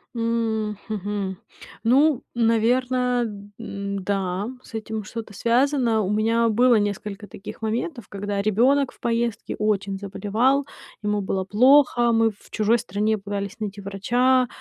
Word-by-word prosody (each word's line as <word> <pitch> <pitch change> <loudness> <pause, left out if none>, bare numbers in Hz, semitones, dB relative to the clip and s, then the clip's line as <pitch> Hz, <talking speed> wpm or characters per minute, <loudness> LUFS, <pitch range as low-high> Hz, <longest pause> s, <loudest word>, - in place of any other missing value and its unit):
М, 225 -2 -1
хм, 215 - -3
мгм. 200 -2 -3 0.5
Ну, 275 +3 +4
наверное, 245 +2 +2 0.4
н-да, 200 -2 -3
с 230 - -12
этим 220 -1 -4
что-то 225 0 -7
связано. 240 0 +2
У 190 - -1
меня 225 +2 +2
было 245 +3 +4
несколько 205 0 -2
таких 195 +4 -10
моментов, 235 - -3
когда 200 0 -3
ребенок 245 +7 +3
в - - -23
поездке 235 -1 -1
очень 200 -2 0
заболевал, 220 +8 0 0.3
ему 210 0 0
было 190 -1 -2
плохо, 245 +2 +5
мы 225 0 +4
в 210 - -16
чужой 220 +2 +2
стране 215 0 -1
пытались 200 0 -5
найти 205 -1 -5
врача, 245 +6 +2
220 Hz, 130 wpm, -23 LUFS, 205-240 Hz, 0.5 s, плохо